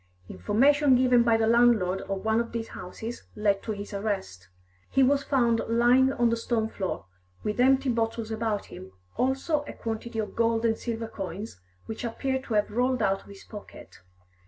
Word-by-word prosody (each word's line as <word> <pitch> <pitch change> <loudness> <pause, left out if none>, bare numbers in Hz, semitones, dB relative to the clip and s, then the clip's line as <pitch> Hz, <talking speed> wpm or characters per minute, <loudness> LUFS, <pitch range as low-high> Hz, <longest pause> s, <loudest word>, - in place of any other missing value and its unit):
Information 265 - +3
given 250 -1 +4
by 230 -1 +3
the 225 - +2
landlord 225 -5 +3
of 195 +1 -3
one 220 +1 +2
of 235 0 -3
these 230 -1 -4
houses 220 +6 -7
led 205 -2 +1
to 220 - -4
his 205 0 -6
arrest. 195 - -4 0.4
He 270 - +3
was 280 +2 +3
found 240 -5 +2
lying 245 +3 +4
on 240 -3 +2
the - - +2
stone 230 -1 -1
floor, 190 - -4 0.4
with 210 +2 -2
empty 265 +1 +4
bottles 225 -1 -2
about 220 -2 -2
him, 95 0 -11 0.2
also 270 +4 0
a - - -6
quantity 225 +1 -5
of 215 -1 -3
gold 230 0 +1
and 225 -1 +2
silver 225 0 -4
coins, 195 - -7 0.3
which 220 - -6
appeared 265 +3 -2
to 225 - -2
have 210 0 +1
rolled 250 +3 +1
out 195 0 +1
of - - -20
his 200 -1 -12
pocket. 205 - -12
230 Hz, 180 wpm, -27 LUFS, 210-245 Hz, 0.4 s, given